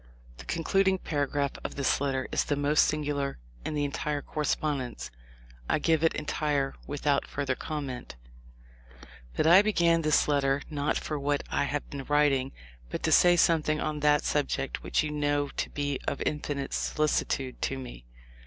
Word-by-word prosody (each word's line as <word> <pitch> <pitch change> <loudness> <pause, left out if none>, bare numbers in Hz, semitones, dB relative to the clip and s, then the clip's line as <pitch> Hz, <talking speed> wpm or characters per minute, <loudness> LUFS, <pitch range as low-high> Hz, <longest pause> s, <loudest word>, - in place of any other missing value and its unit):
The - - -11
concluding 190 +3 +1
paragraph 145 -4 -1
of - - -5
this 140 -1 +1
letter 135 -2 -1
is - - +2
the 145 - 0
most 145 +1 +3
singular 145 -2 -2 0.3
in 155 - -3
the 145 -1 +1
entire 145 0 -2
correspondence. 140 - -2 0.6
I - - +3
g 165 +2 +2
ive 160 0 +1
it 165 - +3
entire 145 -2 -1
without 145 -1 0
further 140 -2 -2
comment: 140 - -5 1.2
"But - - +2
I 175 +4 +8
began 170 -5 +3
this 155 -1 +3
letter 140 -1 +1
not 145 -1 0
for 150 -2 -3
what 145 0 0
I - - +1
have 145 0 -3
been 140 -2 -6
writing, 145 -3 +2 0.4
but - - -5
to - - +1
say 175 0 +6
something 155 -3 +3
on 150 0 -2
that 150 0 +3
subject 140 -2 -1
which - - 0
you 150 - -3
know 145 -1 0
to - - -3
be 145 -2 -2
of - - 0
such - - -4
infinite 145 -2 -2
solicitude 140 -3 -1
to 135 - -1
me. 120 - -9
145 Hz, 170 wpm, -28 LUFS, 140-155 Hz, 1.2 s, I